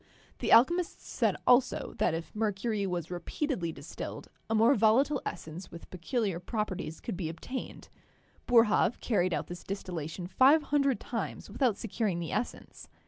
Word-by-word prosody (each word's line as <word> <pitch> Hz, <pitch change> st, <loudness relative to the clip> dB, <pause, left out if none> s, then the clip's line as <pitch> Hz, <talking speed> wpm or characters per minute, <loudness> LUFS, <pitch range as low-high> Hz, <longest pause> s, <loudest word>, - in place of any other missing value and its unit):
The -, -, -1 dB
alchemists 340 Hz, +9 st, +4 dB
said -, -, +1 dB
also 250 Hz, +1 st, +3 dB
that 160 Hz, -, +2 dB
if* 165 Hz, +4 st, -7 dB
mercury 210 Hz, -1 st, -1 dB
was 175 Hz, -2 st, -3 dB
repeatedly 180 Hz, -, -2 dB
distilled, 155 Hz, +2 st, -8 dB, 0.2 s
a 225 Hz, -, +1 dB
more 225 Hz, +5 st, +5 dB
volatile 255 Hz, +6 st, +3 dB
essence 165 Hz, +4 st, -7 dB
with 170 Hz, -, -12 dB
peculiar 190 Hz, 0 st, -2 dB
properties 185 Hz, -5 st, -4 dB
could -, -, -5 dB
be 170 Hz, -3 st, -3 dB
obtained. 255 Hz, +10 st, -7 dB, 0.6 s
Boerhaave 230 Hz, -1 st, +4 dB
carried 185 Hz, -6 st, +1 dB
out -, -, -1 dB
this 175 Hz, 0 st, -8 dB
distillation 175 Hz, -3 st, -5 dB
five 270 Hz, -, +5 dB
hundred 275 Hz, -3 st, +1 dB
times 230 Hz, -3 st, -5 dB
without 235 Hz, -1 st, +1 dB
securing 215 Hz, -4 st, -2 dB
the 170 Hz, -, -4 dB
essence. 220 Hz, +4 st, -4 dB
210 Hz, 145 wpm, -30 LUFS, 175-245 Hz, 0.6 s, more